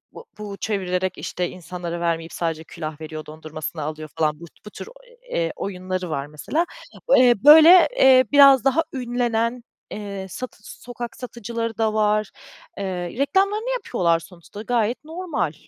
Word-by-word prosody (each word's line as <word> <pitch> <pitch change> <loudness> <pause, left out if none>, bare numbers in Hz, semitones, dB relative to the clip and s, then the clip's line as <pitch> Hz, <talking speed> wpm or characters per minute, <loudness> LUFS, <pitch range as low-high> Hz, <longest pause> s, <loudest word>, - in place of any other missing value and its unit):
b - - -8 0.2
bu 205 -2 -7
çevirerek, 185 -3 -2
işte, 180 -1 -3
insanlara 175 0 -6
vermeyip 165 -1 -2
sadece 165 -2 -3
külah 155 -1 -8
veriyor, 155 0 -7
dondurmasını 155 +1 -7
alıyor, 155 0 -6
falan. 150 -2 0
Bu 170 - -10 0.2
bu - - -8
tür, 210 - -10 0.4
eee, 165 -1 -1
oyunları 185 -2 -4
var, 140 -2 -3
mesela. 210 - -2 0.5
Eee, 250 -1 +6
böyle, 320 +5 +9
eee, 260 -1 +6
biraz 275 -3 +7
daha 270 +5 +3
ünlenen, 240 -2 -1 0.3
eee, 200 -2 -6
satı 255 +7 -7 0.2
sokak 240 -1 -7
satıcıları 230 -2 -5
da 220 -1 +1
var. 215 -1 +1 0.5
Eee, 200 - -3 0.3
reklamlarını 395 - +1
yapıyorlar 185 - 0
sonuçta, 180 +4 -12
gayet 235 +2 -1
normal. 325 - -3
210 Hz, 140 wpm, -22 LUFS, 170-250 Hz, 0.5 s, böyle